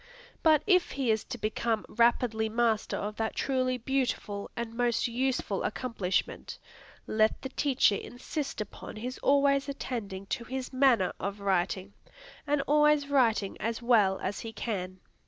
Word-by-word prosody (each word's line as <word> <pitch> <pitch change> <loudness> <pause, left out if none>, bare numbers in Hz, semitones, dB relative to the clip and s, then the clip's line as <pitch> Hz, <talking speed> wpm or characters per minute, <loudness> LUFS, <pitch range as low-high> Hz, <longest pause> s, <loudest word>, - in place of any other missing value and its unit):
But 310 -2 +5
if 365 -3 +3
he 265 -4 +1
is 220 -1 0
to 255 - -6
become 220 0 -1
rapidly 230 -1 +2
master 225 -1 +1
of 210 +1 -4
that 225 0 -2
truly 255 -2 0
beautiful 245 -5 -2
and 230 -1 -4
most 240 -1 +1
useful 245 -4 -1
accomplishment, 210 -6 -2 0.5
let 215 0 +1
the 265 - -3
teacher 260 -7 +2
insist 270 +1 -5
upon 210 - -8
his 245 +4 -5
always 280 0 +3
attending 210 -8 -5
to 240 - -2
his 260 +2 -5
manner 255 -8 +3
of 200 +1 -4
writing, 195 0 0 0.5
and 290 0 +2
always 300 -1 +3
writing 230 -8 +2
as 230 +2 -2
well 210 -6 +4
as 195 +2 -3
he 225 - -6
can. 185 -5 -4
235 Hz, 145 wpm, -29 LUFS, 210-265 Hz, 0.5 s, But